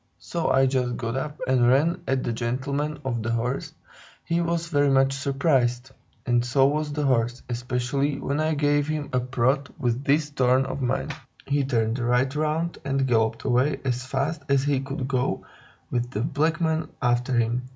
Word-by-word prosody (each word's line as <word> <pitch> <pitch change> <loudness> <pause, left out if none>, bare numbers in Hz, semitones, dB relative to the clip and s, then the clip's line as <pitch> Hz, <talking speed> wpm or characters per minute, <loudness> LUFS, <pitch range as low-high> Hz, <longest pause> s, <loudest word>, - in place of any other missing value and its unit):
So 170 -2 -2
I 135 0 +4
just 125 -2 0
got 115 -1 -3
up 150 +3 -4
and 125 -2 +3
ran 165 +7 +3
at 130 -1 +1
the 120 - -1
gentleman 140 +6 -2
of 120 -3 -1
the 110 - -3
horse; 125 +4 -2 0.5
he 170 +1 +1
was 170 0 -1
very 145 -3 +3
much 135 0 +3
surprised, 135 -3 0 0.3
and 120 -1 +2
so 135 +2 +3
was 150 +1 0
the 145 0 -1
horse, 120 -2 +1
especially 125 +3 -1
when 140 +2 -2
I 155 0 +1
gave 145 0 +2
him 155 -2 -3
a 125 - +3
prod 130 +3 0
with 125 -2 -1
this 145 +2 +2
horn 130 0 +3
of 135 +1 -4
mine. 130 +3 -1 0.3
He 140 0 +1
turned 115 -2 0
right 125 +3 +1
round 155 +3 -1
and 135 -1 0
galloped 115 -2 +1
away 130 +5 +2
as 125 -1 -1
fast 145 +4 -2
as 140 -1 +3
he 145 -2 +1
could 135 -1 -4
go, 130 -2 -1 0.5
with 120 0 -1
the 110 -4 -3
black 155 +4 0
men 160 -1 0
after 125 +1 +1
him. 120 +2 0
135 Hz, 180 wpm, -25 LUFS, 125-145 Hz, 0.5 s, I